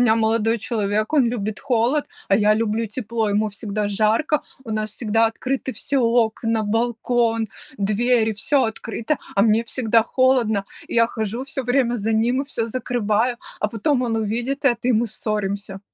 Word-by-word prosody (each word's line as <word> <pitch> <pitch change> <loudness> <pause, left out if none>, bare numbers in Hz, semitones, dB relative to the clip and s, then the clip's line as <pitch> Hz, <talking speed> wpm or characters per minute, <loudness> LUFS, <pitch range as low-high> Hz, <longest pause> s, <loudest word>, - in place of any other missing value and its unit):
меня 225 -2 +4
молодой 225 0 +2
человек- 215 +1 -1
он 280 -5 +4
любит 215 -3 -3
холод, 255 +3 +1 0.2
а 195 - +5
я 210 0 +4
люблю 225 +1 0
тепло, 225 0 -2
ему 210 +1 +1
всегда 205 0 -3
жарко, 220 +9 +1 0.2
у 230 - -7
нас 215 0 -2
всегда 225 +1 +1
открыты 260 +4 -3
все 280 -1 -1
окна, 230 -1 +1
балкон, 230 0 0 0.3
двери, 220 +3 +2
всё 260 +6 +1
открыто, 225 +4 -3 0.2
а 200 - +4
мне 220 +1 +3
всегда 230 -1 +2
холодно. 240 -5 +2 0.2
И - - -5
я 230 0 +5
хожу 225 +2 -4
всё 270 -1 -3
время 245 -1 +1
за 220 0 -1
ним 235 +4 +2
и - - -7
всё 230 -5 -2
закрываю, 240 -1 0 0.2
а 210 - +1
потом 245 +5 0
он 230 -2 0
увидит 235 +6 -2
это, 240 -2 +2
и - - +4
мы 230 +1 +2
ссоримся. 200 -2 -3
225 Hz, 170 wpm, -22 LUFS, 215-245 Hz, 0.3 s, а